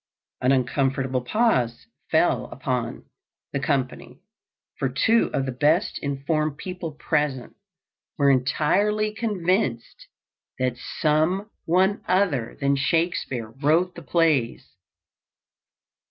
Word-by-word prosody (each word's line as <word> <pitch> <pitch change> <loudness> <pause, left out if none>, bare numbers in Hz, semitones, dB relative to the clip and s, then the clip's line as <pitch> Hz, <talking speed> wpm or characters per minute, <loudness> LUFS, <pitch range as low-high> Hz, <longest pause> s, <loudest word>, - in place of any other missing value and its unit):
An 125 - +3
uncomfortable 135 0 +1
pause 125 - +1 0.2
fell 140 -6 +2
upon, 125 -2 -3 0.5
the 140 - 0
company, 135 -2 -2 0.6
for 135 - 0
two 225 - +2
of 135 - -1
the 130 - -2
best 150 - +1
informed 145 +2 -1
people 180 -4 -6
present 150 -5 -1 0.6
were 140 -2 +4
entirely 200 +11 +1
convinced 190 - -1 0.5
that 130 -1 0
some 160 - 0
one 190 +4 +2
other 180 - +1
than 140 -1 +2
Shakespeare 135 -6 -1
wrote 170 +5 +3
the 170 - -10
plays. 150 -5 0
150 Hz, 100 wpm, -24 LUFS, 130-180 Hz, 0.6 s, were